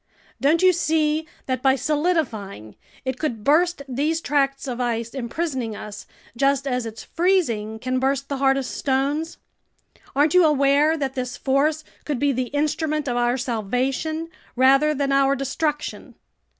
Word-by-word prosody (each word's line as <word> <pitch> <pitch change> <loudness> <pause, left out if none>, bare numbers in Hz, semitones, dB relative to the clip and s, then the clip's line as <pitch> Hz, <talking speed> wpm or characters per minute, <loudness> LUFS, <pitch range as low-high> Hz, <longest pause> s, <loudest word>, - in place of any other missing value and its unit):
Don't 315 +5 +3
you 370 0 +6
see 315 -1 +1 0.2
that 255 -2 -2
by 265 0 +4
solidifying, 260 - -2 0.3
it 260 -1 -3
could 235 -9 -3
burst 330 +3 +2
these 295 +5 0
tracts 275 -3 0
of 250 -1 -3
ice 230 -1 -1
imprisoning 260 -3 -3
us, 205 0 -9 0.3
just 275 +2 +2
as 250 -3 -1
its 225 0 -8
freezing 245 - 0
can 255 +3 -2
burst 275 +1 0
the 280 - -3
hardest 270 -1 +1
stones? 285 +4 -1 0.8
Aren't 290 +2 +3
you 365 -1 +6
aware 295 +1 +3
that 275 -3 -2
this 250 -2 -4
force 295 +3 +1 0.2
could 295 -3 -2
be 285 +2 +2
the 255 -1 -1
instrument 300 +2 -1
of 245 - -1
our 240 +1 +1
salvation 260 +7 -2 0.3
rather 275 +4 +4
than 275 0 0
our 275 0 +3
destruction?" 295 +3 -3
275 Hz, 150 wpm, -23 LUFS, 250-305 Hz, 0.8 s, you